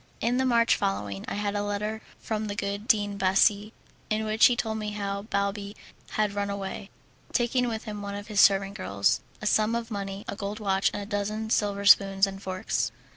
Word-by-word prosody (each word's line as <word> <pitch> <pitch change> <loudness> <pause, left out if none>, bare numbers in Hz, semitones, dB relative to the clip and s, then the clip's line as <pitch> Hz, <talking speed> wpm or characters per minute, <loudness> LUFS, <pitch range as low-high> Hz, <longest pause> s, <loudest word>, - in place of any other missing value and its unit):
In 240 +2 +1
the 260 0 +2
March 235 -2 +4
following 100 0 -2
I - - -3
had 205 0 -1
a 205 - 0
letter 210 +2 -3 0.2
from 215 -1 -3
the 205 - -4
good 200 +1 -3
Dean 205 -4 +2
Bassi, 200 +2 +3 0.4
in 215 0 0
which 215 +1 +5
he 245 - +1
told 220 -2 -2
me 210 -1 -4
how 200 -1 -3
Balbi 200 0 -2 0.4
had 210 -1 +1
run 200 0 -2
away, 200 0 -5 0.4
taking 245 0 +1
with 220 -2 -3
him 210 -1 -6
one 200 0 -5
of 205 0 -6
his 210 -3 +2
servant 195 0 +4
girls, 100 - 0 0.2
a - - -3
sum 215 +2 +2
of 235 0 -4
money, 200 -1 -5
a 200 - -4
gold 205 +1 -5
watch, 195 -2 +2
and 205 - -4
a - - -7
dozen 215 +1 -3
silver 200 -2 0
spoons 195 -1 +6
and 195 0 -7
forks. 185 - -2
205 Hz, 205 wpm, -27 LUFS, 200-215 Hz, 0.4 s, spoons